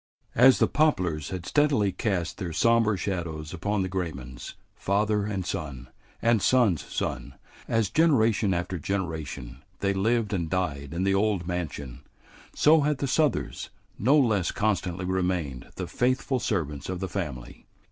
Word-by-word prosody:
As 130 Hz, +2 st, +7 dB
the -, -, +4 dB
poplars 90 Hz, -, +1 dB
had 90 Hz, -2 st, -5 dB
steadily 140 Hz, -9 st, +2 dB
cast 95 Hz, -4 st, -2 dB
their 90 Hz, -5 st, -4 dB
sombre 115 Hz, 0 st, +3 dB
shadows 85 Hz, -4 st, -4 dB
upon 100 Hz, +3 st, -1 dB
the -, -, -2 dB
Graymans, 75 Hz, -10 st, -5 dB, 0.2 s
father 105 Hz, +1 st, 0 dB
and 95 Hz, -4 st, -3 dB
son 75 Hz, -11 st, -5 dB, 0.3 s
and 115 Hz, -2 st, +3 dB
son's 115 Hz, -, +3 dB
son, -, -, -4 dB, 0.3 s
as 110 Hz, -4 st, +1 dB
generation 115 Hz, -9 st, +3 dB
after 90 Hz, 0 st, -2 dB
generation 80 Hz, -8 st, -4 dB, 0.2 s
they 100 Hz, 0 st, +1 dB
lived 110 Hz, +2 st, +1 dB
and 85 Hz, -4 st, -1 dB
died 75 Hz, -6 st, -2 dB
in 90 Hz, -, -1 dB
the 95 Hz, 0 st, +2 dB
old 100 Hz, -3 st, +1 dB
mansion, 75 Hz, -8 st, -4 dB, 0.5 s
so 155 Hz, +1 st, +5 dB
had 150 Hz, 0 st, +1 dB
the 140 Hz, -, -2 dB
Southers 145 Hz, 0 st, 0 dB, 0.3 s
no 135 Hz, +8 st, +4 dB
less 110 Hz, -, +2 dB
constantly 95 Hz, -4 st, -1 dB
remained 90 Hz, -8 st, -2 dB
the -, -, -4 dB
faithful 130 Hz, +1 st, 0 dB
servants 75 Hz, -, -2 dB
of 95 Hz, -1 st, -3 dB
the 95 Hz, -, -2 dB
family. 75 Hz, -12 st, -6 dB
95 Hz, 145 wpm, -27 LUFS, 85-110 Hz, 0.5 s, As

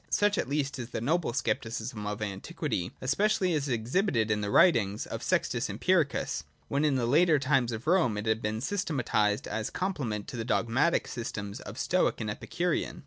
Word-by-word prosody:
Such 205 Hz, 0 st, +2 dB
at -, -, -2 dB
least 140 Hz, -2 st, -1 dB
is 120 Hz, -1 st, -5 dB
the -, -, -3 dB
noble 160 Hz, +6 st, 0 dB
Scepticism 115 Hz, -3 st, -2 dB
of 105 Hz, +1 st, -3 dB
antiquity, 95 Hz, -2 st, -3 dB
especially 185 Hz, +6 st, +2 dB
as 145 Hz, -2 st, -1 dB
exhibited 120 Hz, -, +1 dB
in 105 Hz, 0 st, +1 dB
the 100 Hz, -, -2 dB
writings 110 Hz, -, +4 dB
of -, -, -6 dB
Sextus -, -, 0 dB
Empiricus, -, -, +1 dB, 0.3 s
when 140 Hz, +2 st, +1 dB
in 150 Hz, -3 st, +3 dB
the 125 Hz, -3 st, +1 dB
later 155 Hz, +5 st, +4 dB
times 135 Hz, -3 st, +2 dB
of 115 Hz, +1 st, -5 dB
Rome 160 Hz, -, +3 dB
it 105 Hz, -, -3 dB
had 110 Hz, 0 st, +1 dB
been 110 Hz, 0 st, -2 dB
systematised 125 Hz, -, 0 dB
as 110 Hz, -1 st, -2 dB
a -, -, -18 dB
complement 135 Hz, -, -2 dB
to 130 Hz, -, -6 dB
the 115 Hz, -, -2 dB
dogmatic 125 Hz, +7 st, +1 dB
systems 105 Hz, -4 st, -5 dB
of -, -, -9 dB
Stoic -, -, +1 dB
and 110 Hz, -2 st, -2 dB
Epi -, -, -8 dB
curean. 175 Hz, -1 st, -1 dB
120 Hz, 190 wpm, -29 LUFS, 110-155 Hz, 0.3 s, writings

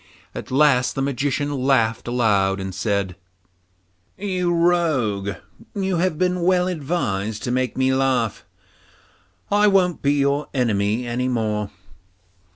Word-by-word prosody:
At -, -, -7 dB
last 130 Hz, -2 st, +3 dB
the 135 Hz, -, -1 dB
Magician 140 Hz, +2 st, -1 dB
laughed 125 Hz, -5 st, +1 dB
aloud 105 Hz, -5 st, +1 dB
and 95 Hz, 0 st, -5 dB
said, 100 Hz, -1 st, -1 dB, 1.0 s
'You 185 Hz, -3 st, -1 dB
rogue, 150 Hz, -, +1 dB, 0.4 s
you 190 Hz, -3 st, -1 dB
have 170 Hz, -2 st, 0 dB
been 180 Hz, 0 st, 0 dB
well 180 Hz, 0 st, +2 dB
advised 130 Hz, -, -2 dB
to 120 Hz, -, -2 dB
make 130 Hz, 0 st, -1 dB
me 130 Hz, 0 st, +2 dB
laugh; 130 Hz, -4 st, 0 dB, 1.1 s
I 205 Hz, +1 st, +4 dB
won't 185 Hz, -4 st, +2 dB
be 140 Hz, 0 st, +2 dB
your 140 Hz, +1 st, +1 dB
enemy 110 Hz, -1 st, 0 dB
any 120 Hz, +2 st, -2 dB
more. 110 Hz, -4 st, -1 dB
130 Hz, 125 wpm, -22 LUFS, 110-170 Hz, 1.1 s, I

